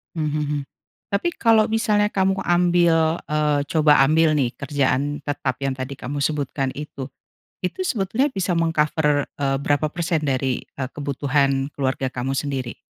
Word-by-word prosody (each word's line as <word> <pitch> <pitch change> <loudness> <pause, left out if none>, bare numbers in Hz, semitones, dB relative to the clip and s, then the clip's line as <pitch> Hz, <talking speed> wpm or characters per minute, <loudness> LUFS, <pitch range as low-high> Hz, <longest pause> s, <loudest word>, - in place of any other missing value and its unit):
Mmm, 155 -2 -1
hmm 150 0 -1
hmm. 145 -1 -1 0.5
Tapi 205 +13 0
kalau 225 -1 +4
misalnya 210 -2 +2
kamu 190 0 +2
ambil, 175 -2 +3 0.2
eee, 150 -1 +2
coba 150 -3 +5
ambil 155 +2 +3
nih 130 -5 +1
kerjaan 140 +1 0
tetap 140 -3 -2
yang 135 - 0
tadi 130 +1 -5
kamu 140 +3 -5
sebutkan 140 -2 -1
itu. 140 -2 -6 0.5
Itu 185 - -3
sebetulnya 250 - 0
bisa 185 -4 -1
meng-cover, 150 -3 +1
eee, 135 -1 0
berapa 145 +2 0
persen 170 -2 -1
dari, 130 -2 -1
eee, 130 -2 -6
kebutuhan 140 -1 0
keluarga 135 -1 -1
kamu 130 +1 -3
sendiri? 135 -4 -3
150 Hz, 150 wpm, -22 LUFS, 135-170 Hz, 0.5 s, coba